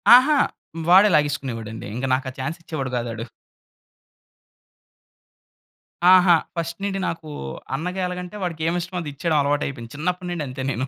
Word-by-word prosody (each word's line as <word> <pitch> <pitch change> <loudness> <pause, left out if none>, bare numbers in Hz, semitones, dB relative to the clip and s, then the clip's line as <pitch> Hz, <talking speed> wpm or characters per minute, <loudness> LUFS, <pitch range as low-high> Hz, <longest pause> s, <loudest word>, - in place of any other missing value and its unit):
ఆహా! 280 +5 +6 0.5
వాడే 195 +3 +8
లాగేసుకునేవాడండి. 130 -7 -1
ఇంక 130 +2 -2
నాకు 130 0 0
ఆ - - -17
చాన్స్ 155 +6 -3
ఇచ్చేవాడు 150 -6 -4
గాదు 120 -1 -2
ఆడు. 115 0 -5 2.9
ఆహా! 180 -1 +7 0.2
ఫస్ట్ 170 +1 -3
నుండి 195 -1 -1
నాకూ 165 -2 -4 0.5
అన్నగా 180 +6 -3
ఎలాగంటే 180 +2 -6
వాడికి 165 -3 -3
ఏమిష్టమో 175 +1 -2
అదిచ్చేయడం 150 +1 -1
అలవాటయిపోయింది. 140 -4 -2
చిన్నప్పటినుండి 175 +1 -2
అంతే 130 +1 -6
నేను. 130 +1 -2
160 Hz, 125 wpm, -23 LUFS, 135-180 Hz, 2.9 s, వాడే